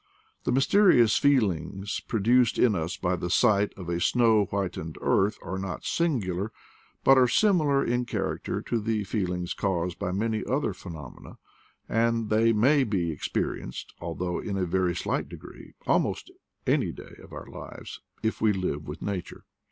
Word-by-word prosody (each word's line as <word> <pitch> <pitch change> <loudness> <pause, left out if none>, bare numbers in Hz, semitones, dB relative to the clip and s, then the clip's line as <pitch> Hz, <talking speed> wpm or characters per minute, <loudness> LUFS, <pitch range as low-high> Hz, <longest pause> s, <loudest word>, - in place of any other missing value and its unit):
The - - +1
mysterious 135 - +5
feel 135 -8 +4
ings 95 +4 -5
produced 120 +2 +2
in 115 -5 +4
ns 85 +1 -3
by 90 0 0
the 90 0 -4
sight 105 +1 +3
of 90 -3 -8
a 85 0 -1
snow 115 -3 +4
whit 100 -1 -2
ened 80 0 -7
earth 105 +2 +2
are 95 +1 -4
not 95 -1 -5
singular, 110 - -1 0.5
but 135 0 +7
are 125 - +5
similar 150 - +3
in 120 +1 0
character - - -3
to 115 - -1
the 110 -1 -1
feelings 90 -4 -2
caused 90 -3 -2
by 95 -3 -2
many 110 +3 -1
other 140 +3 -1
phenomena, 80 -8 -10 0.5
and 115 -1 +1
they 115 +2 +4
may 130 +6 +4
be 95 -8 -1
experienced, 70 -4 -4
al 85 -1 -4
though 90 -1 -2
in 100 -2 -3
a 95 - 0
very 90 0 0
slight - - -2
degree, - - -12
almost - - 0 0.3
any - - +2
day - - -12
of - - -15
our - - -8
lives, - - -9 0.2
if 110 - -1
we 110 - +4
live 80 -6 -3
with 75 +2 -7
nature. 95 -4 -5
100 Hz, 165 wpm, -27 LUFS, 90-115 Hz, 0.5 s, but